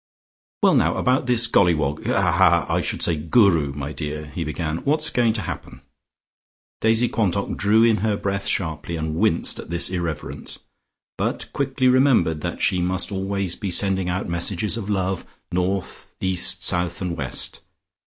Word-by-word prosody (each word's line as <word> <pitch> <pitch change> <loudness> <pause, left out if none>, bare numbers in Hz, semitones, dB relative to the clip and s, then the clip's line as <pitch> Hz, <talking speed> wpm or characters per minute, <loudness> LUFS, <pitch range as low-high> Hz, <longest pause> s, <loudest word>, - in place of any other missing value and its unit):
"Well, - - +5
now, - - +2
about 125 0 +1
this 120 -2 +4
Golliwog 80 -9 +1
haha - - +3
I - - 0
should - - -2
say 85 - +1
Guru, 80 - +3
my 70 +1 -5
dear," 75 0 -5
he 75 +3 -5
began, 80 +1 -3
"what's 155 - +1
going 120 -2 +2
to 110 -2 -3
happen?" - - -7 1.0
Daisy 115 +2 +3
Quantock 100 -4 -1
drew 110 +3 +3
in 115 -2 +4
her 105 +1 0
breath 100 -1 -3
sharply 80 -1 -2
and 80 -1 -3
winced - - +1
at - - -9
this 85 +1 0
irreverence, 85 -4 -4 0.6
but - - -2
quickly 135 -1 0
remembered 125 - +3
that - - -4
she 90 - +2
must 90 +2 -1
always 95 -2 -2
be 100 - -4
sending 95 0 +2
out 90 +2 -2
messages 85 +4 -1
of 105 -3 -5
love, 95 -2 -1 0.3
north, 90 +2 -3
east, 95 -2 +1
south, 90 0 +1
and 90 -3 -3
west. 65 -5 -2
95 Hz, 160 wpm, -22 LUFS, 85-110 Hz, 1.0 s, Well